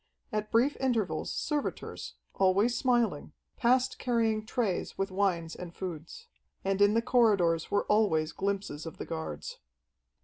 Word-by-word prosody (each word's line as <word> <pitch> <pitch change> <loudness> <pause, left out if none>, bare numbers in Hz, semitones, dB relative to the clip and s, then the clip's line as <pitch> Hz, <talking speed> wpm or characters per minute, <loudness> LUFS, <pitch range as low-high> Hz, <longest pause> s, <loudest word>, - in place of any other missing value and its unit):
At 215 0 -2
brief 250 +6 +3
intervals, 235 -7 0
servitors, 295 -2 -3 0.2
always 195 +5 +3
smiling, 235 - +1 0.2
passed 255 +1 +2
carrying 225 -3 +1
trays 220 -8 -1
with 195 0 -1
wines 180 -4 0
and 175 -1 -8
foods. 170 -4 -7 0.4
And 195 +1 +1
in 205 +1 +5
the 230 - +2
corridors 200 -10 +3
were 205 - +1
always 175 -8 +2
glimpses 195 -6 -3
of 165 - -8
the - - -5
guards. 160 - -5
200 Hz, 135 wpm, -30 LUFS, 175-230 Hz, 0.4 s, in